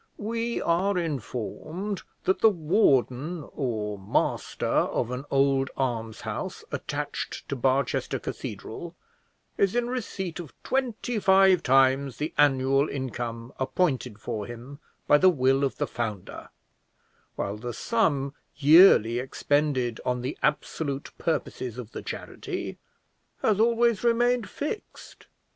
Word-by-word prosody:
We 230 +2 -2
are 180 +4 +1
informed 160 - -4 0.2
that 190 - +1
the 225 - +8
warden 155 - +1
or 105 -6 -2
master 95 - -1
of 120 - +1
an 125 +2 -4
old 135 -1 +2
almshouse 115 -4 -3
attached - - -4
to - - -1
Barchester 135 +2 0
Cathedral - - -7 0.6
is 195 +2 +3
in 245 0 0
receipt 190 -9 -4
of 165 -6 -9
twenty 245 -3 -1
five 190 -2 +5
times 135 -1 +3
the 150 +2 -3
annual 135 0 +4
income 120 -3 -5
appointed 130 - 0
for 110 -2 -4
him 120 +4 -9 0.3
by 145 - +5
the 185 - +7
will 135 -4 +2
of 135 - -1
the - - 0
founder, 105 -6 -5 0.9
while 100 +2 -3
the 120 +3 -5
sum 145 - 0 0.2
yearly 145 - +7
expended 130 -2 0
on 125 -1 -1
the 130 - -3
absolute 145 -1 -1
purposes 130 -6 -2
of 120 -3 -7
the - - -6
charity - - -6 0.6
has 210 -2 +3
always 235 -1 +3
remained 240 -1 +2
fixed. 305 +9 -7
140 Hz, 120 wpm, -27 LUFS, 125-190 Hz, 0.9 s, the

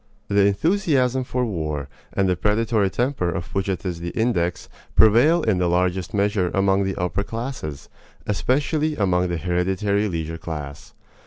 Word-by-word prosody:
The 100 0 +4
enthusiasm 130 - +1
for 125 0 -1
war, 75 -8 -3 0.2
and 95 - +1
the 90 - +2
predatory 105 0 +1
temper 120 -5 -1
of 85 0 -5
which 95 0 -1
it 95 0 -3
is 90 -2 -3
the 85 0 -4
index, 90 -7 0 0.3
prevail 135 +10 +5
in 100 -5 +1
the 90 -1 +1
largest 90 +1 0
measure 100 -3 +1
among 95 0 +2
the 95 -1 -2
upper 90 +2 -1
classes, 115 - -5 0.4
especially 150 - 0
among 90 -4 +1
the 85 -1 -2
hereditary 95 +4 0
leisure 80 -1 -4
class. 75 -3 -7
95 Hz, 155 wpm, -23 LUFS, 90-115 Hz, 0.4 s, prevail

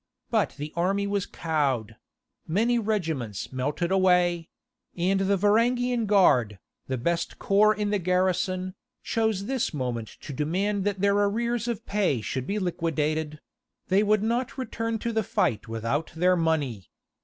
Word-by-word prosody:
But - - +1
the 150 +1 -6
army 195 +4 +1
was 200 -1 -1
cowed; 135 -9 -1 0.5
many 230 +8 +2
regiments 160 - -2
melted 145 +7 -1
away; 180 -3 +3 0.5
and 190 +3 +2
the 195 +1 +2
Varangian 235 +3 +2
Guard, 130 - +4 0.3
the 130 - -2
best 170 +7 -1
corps 210 +2 +4
in 210 -1 -1
the 205 - +1
garrison, 185 +1 0 0.3
chose 220 -4 0
this 255 -8 -1
moment 120 -4 -3
to 145 - -7
demand 190 +8 -1
that 200 -2 -1
their 200 0 +4
arrears 235 +3 0
of 230 -2 -3
pay 200 - +1
should 130 +4 -4
be 205 - -1
liquidated; 155 -4 -1 0.5
they 190 +2 +4
would 210 0 +2
not 240 +4 -1
return 230 -3 -2
to 235 +2 -3
the 220 - +2
fight 115 - 0
without 115 +7 -2
their 180 +2 +3
money! 150 - -1
185 Hz, 145 wpm, -26 LUFS, 150-210 Hz, 0.5 s, Guard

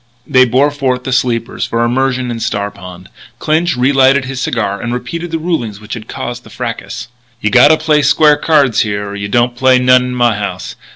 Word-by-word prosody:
They 130 -2 +4
bore 130 +4 +2
forth 130 -3 -2
the 130 - -3
sleepers 120 -2 -1
for 115 0 0
immersion 130 0 -1
in 115 - -5
Star 100 -2 -2
Pond. 90 -2 -12 0.3
Clinch 160 +3 0
relighted 135 +1 +3
his 135 0 -5
cigar 105 -6 -2
and 120 - -4
repeated 145 +8 -5
the 165 - -2
rulings 140 - -3
which 105 0 -9
had 110 -3 -7
caused 120 0 -6
the - - -15
fracas: 115 -1 -6 0.3
"You 110 -2 -1
gotta 145 +7 +6
play 155 -1 +2
square 150 +1 +4
cards 145 -7 +2
here 105 -1 -3
or 100 - -7
you 100 0 -4
don't 120 +3 +1
play 130 +1 +4
none 125 0 +4
in 125 0 -4
my 120 -3 +2
house. 105 -1 -5
125 Hz, 205 wpm, -14 LUFS, 115-135 Hz, 0.3 s, gotta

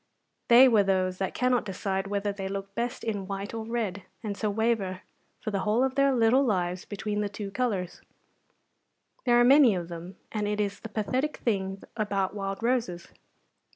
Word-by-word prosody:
They 245 +3 +8
were 225 -5 +5
those 185 -2 0
that 190 - -2
cannot 250 -1 +2
decide 195 -1 -3
whether 200 0 -1
they 195 -1 -5
look 195 0 -5
best 235 +4 -3
in 205 -4 -3
white 200 +1 -5
or 225 -1 -4
red, 220 -5 -2 0.2
and 205 -2 -3
so 210 +1 -1
waver 205 -3 0 0.4
for 215 - -4
the 200 - -1
whole 215 +5 +2
of 265 -1 +1
their 275 0 +3
little 250 +2 +4
lives 180 -6 -1
between 210 0 -3
the 205 - -1
two 200 0 -6
colours; 200 -6 -2 1.2
there 240 -1 +5
are - - +6
many 260 -3 +6
of 175 -1 -4
them, 175 +2 -8
and 210 -2 -1
it 210 0 -1
is 200 -1 -1
the 225 - -8
pathetic 255 +8 -1
thing 195 -4 -2
about 200 -3 -1
wild 195 +1 -4
roses. 235 -8 -1
205 Hz, 185 wpm, -28 LUFS, 195-235 Hz, 1.2 s, They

